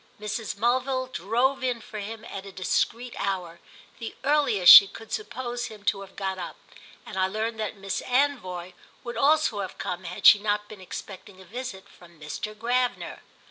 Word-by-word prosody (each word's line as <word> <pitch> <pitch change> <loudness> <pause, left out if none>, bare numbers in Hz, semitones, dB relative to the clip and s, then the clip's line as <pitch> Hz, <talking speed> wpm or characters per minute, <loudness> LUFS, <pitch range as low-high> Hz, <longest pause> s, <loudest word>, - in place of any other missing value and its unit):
Mrs. 210 -1 -4
Mulville 255 +3 +1
drove 245 +8 0
in 250 -2 0
for 215 -1 -8
him 220 +2 -7
at 195 - -7
a - - -9
discreet 230 +6 -1
hour—the 190 +4 -6
earliest 275 -11 +7
she 200 - +11
could 225 +3 -12
suppose 245 - -4
him 210 -2 -12
to 195 0 +1
have 195 -1 -12
got 190 -1 -3
up; 175 - -6 0.5
and 200 - -8
I 190 0 +2
learned 220 +3 -3
that 215 -1 -3
Miss 195 -1 -3
Anvoy 220 -10 0 0.3
would 240 - -6
also 295 -6 +3
have 190 -2 -5
come 180 0 -4
had 180 +1 -6
she 205 - +10
not 210 0 -1
been 210 -2 -11
expecting 190 +1 -9
a 190 - -13
visit 215 -1 -7
from 170 -2 -18
Mr. 155 +8 -6
Gravener. 245 +3 -1
210 Hz, 175 wpm, -26 LUFS, 190-245 Hz, 0.5 s, she